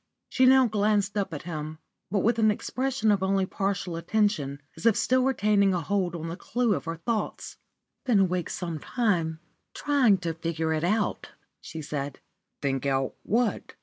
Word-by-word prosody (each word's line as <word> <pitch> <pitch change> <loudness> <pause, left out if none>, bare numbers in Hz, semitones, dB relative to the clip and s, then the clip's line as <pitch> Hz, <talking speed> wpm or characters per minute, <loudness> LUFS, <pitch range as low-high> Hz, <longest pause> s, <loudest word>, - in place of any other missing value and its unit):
She 255 0 +4
now 265 0 +7
glanced 205 -2 +1
up 200 -2 -1
at 150 - -6
him, 155 -2 -5 0.3
but 200 +1 +1
with 230 +3 +2
an 215 -1 +5
expression 250 +1 0
of 200 -2 +2
only 190 0 +1
partial 195 -2 -2
attention, 170 -6 0 0.2
as - - -1
if 225 - +5
still 255 0 +2
retaining 210 -6 +3
a 175 - -1
hold 180 0 -1
on 165 -1 -5
the 165 - -4
clue 235 +3 0
of - - -3
her 165 0 -3
thoughts. 215 +6 -3 0.4
"I've - - -53
been 230 -5 +4
awake 180 -2 0
some 170 -3 -4
time 170 - -1 0.3
trying 270 -9 +3
to 165 - 0
think 165 0 -4
it 160 -1 0
out," 210 +4 0 0.3
she 160 -1 -8
said. 145 -2 -4 0.4
"Think 135 0 0
out 135 -1 0
what?" 230 +1 -1
195 Hz, 180 wpm, -27 LUFS, 165-220 Hz, 0.4 s, now